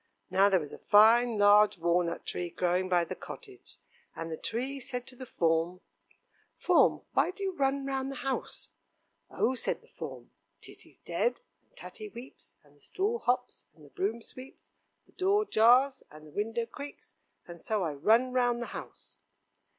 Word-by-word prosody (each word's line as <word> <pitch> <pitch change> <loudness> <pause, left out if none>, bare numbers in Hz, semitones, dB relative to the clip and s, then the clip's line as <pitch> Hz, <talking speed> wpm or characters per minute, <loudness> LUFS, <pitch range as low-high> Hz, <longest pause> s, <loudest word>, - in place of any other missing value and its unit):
Now 195 +1 +5
there 190 -2 +3
was 150 -3 -8
a - - -10
fine 225 +2 +5
large 205 0 +5
walnut 170 0 0
tree 175 -1 -4
growing 180 +2 0
by 175 -2 +3
the - - -5
cottage, 400 -5 -11 0.4
and 165 0 -6
the - - -2
tree 260 - -4
said 250 -1 -5
to 255 - -10
the 255 0 -9
form: 165 0 0 0.8
"Form, - - +3
why - - +3
do 395 +2 -7
you 385 - 0
run 275 -2 0
round 270 0 -2
the - - -6
house?" 270 - -4 0.6
"Oh!" 255 - 0
said 255 - -3
the - - -23
form, - - -8 0.3
"Titty's - - -13
dead, - - -2 0.3
and - - -35
Tatty 430 -3 -9
weeps, 255 -7 -13
and 145 -1 -24
the 145 - -26
stool 420 - -2
hops, 245 - -2
and 155 -3 -17
the 140 - -18
broom 220 +5 -2
sweeps, 255 +3 -13 0.3
the - - -26
door 400 +3 +1
jars, 250 - +4
and 155 0 -14
the 150 - -14
window 225 +6 -2
creaks, 280 +5 -10 0.3
and 170 -1 -10
so 210 +2 -1
I 160 -3 -2
run 225 - +3
round 245 -1 +2
the 240 - -3
house." - - -10
230 Hz, 175 wpm, -30 LUFS, 180-270 Hz, 0.8 s, Now